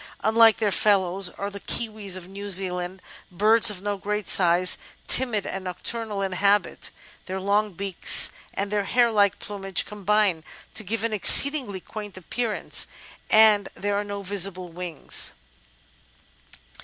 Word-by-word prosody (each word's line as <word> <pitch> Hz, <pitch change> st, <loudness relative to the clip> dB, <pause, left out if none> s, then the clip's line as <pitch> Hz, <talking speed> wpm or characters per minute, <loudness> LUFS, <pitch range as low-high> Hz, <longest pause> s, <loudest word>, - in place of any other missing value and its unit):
Unlike 225 Hz, +1 st, +4 dB
their 210 Hz, -3 st, -1 dB
fellows 195 Hz, -2 st, +1 dB
are 200 Hz, +2 st, -7 dB
the 200 Hz, -, -9 dB
Kiwis 210 Hz, -4 st, -2 dB
of 180 Hz, -1 st, -11 dB
New 200 Hz, +2 st, -8 dB
Zealand, 185 Hz, -1 st, -1 dB, 0.3 s
birds 220 Hz, +5 st, +4 dB
of 195 Hz, -2 st, -6 dB
no 205 Hz, -1 st, -3 dB
great 210 Hz, +1 st, -4 dB
size, 180 Hz, 0 st, +4 dB, 0.3 s
timid 240 Hz, -6 st, +2 dB
and 195 Hz, -, -6 dB
nocturnal 205 Hz, +3 st, -3 dB
in 195 Hz, -, -3 dB
habit; 200 Hz, +2 st, 0 dB, 0.4 s
their 190 Hz, 0 st, -5 dB
long 205 Hz, +1 st, -1 dB
beaks 195 Hz, 0 st, +3 dB, 0.2 s
and 200 Hz, +1 st, -4 dB
their 205 Hz, -1 st, -1 dB
hair 240 Hz, +2 st, +2 dB
like 205 Hz, -2 st, +1 dB
plumage 195 Hz, -2 st, -2 dB
combine 210 Hz, -4 st, -1 dB, 0.3 s
to 220 Hz, -, -2 dB
give 220 Hz, +2 st, -4 dB
an 230 Hz, -1 st, -2 dB
exceedingly 250 Hz, 0 st, +5 dB
quaint 205 Hz, 0 st, -10 dB
appearance, 220 Hz, +5 st, -1 dB, 0.4 s
and 215 Hz, -2 st, +4 dB
there 205 Hz, 0 st, -3 dB
are 205 Hz, -, -2 dB
no 200 Hz, -1 st, -7 dB
visible 190 Hz, -2 st, -1 dB
wings. 170 Hz, -2 st, -2 dB
200 Hz, 145 wpm, -23 LUFS, 190-215 Hz, 0.4 s, exceedingly